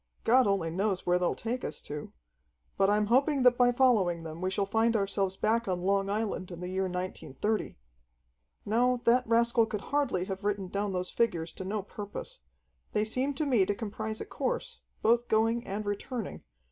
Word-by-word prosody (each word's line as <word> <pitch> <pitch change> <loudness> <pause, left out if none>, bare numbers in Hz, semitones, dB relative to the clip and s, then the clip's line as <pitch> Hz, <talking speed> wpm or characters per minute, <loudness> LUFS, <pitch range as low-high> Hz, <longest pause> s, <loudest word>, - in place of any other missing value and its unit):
God 250 0 +5
only 190 -5 +1
knows 190 +2 -1
where 180 0 +3
they'll 180 - +1
take 240 +3 -3
us - - -4
to. 145 0 -7 0.6
But 195 0 +3
I'm 210 +1 +3
hoping 265 +4 +3
that 250 -1 +6
by 245 0 +4
following 215 -10 +3
them 160 +1 -7
we 185 - 0
shall 195 +1 0
find 225 +3 +2
ourselves 195 -2 0
back 230 +1 +1
on 180 -2 -1
Long 195 +1 +1
Island 205 -3 -2
in 175 -2 -8
the 180 0 -5
year 190 +1 0
1930. 185 +2 -3 0.9
"No, 245 +3 +2
that 250 +1 +4
rascal 230 0 +3
could 210 -2 -4
hardly 280 -11 +1
have 190 +1 -5
written 200 -2 -1
down 200 +1 -1
those 180 -1 -3
figures 170 -8 0
to - - -7
no 200 +2 -2
purpose. 210 - -7 0.5
They 210 0 +2
seem 260 +5 -1
to 305 - -1
me 245 -8 +4
to 205 +2 0
comprise 215 0 -4
a - - -5
course, - - -3 0.2
both 235 +2 +3
going 225 +2 +1
and 205 +2 -3
returning. 205 +2 -4
210 Hz, 185 wpm, -30 LUFS, 190-235 Hz, 0.9 s, that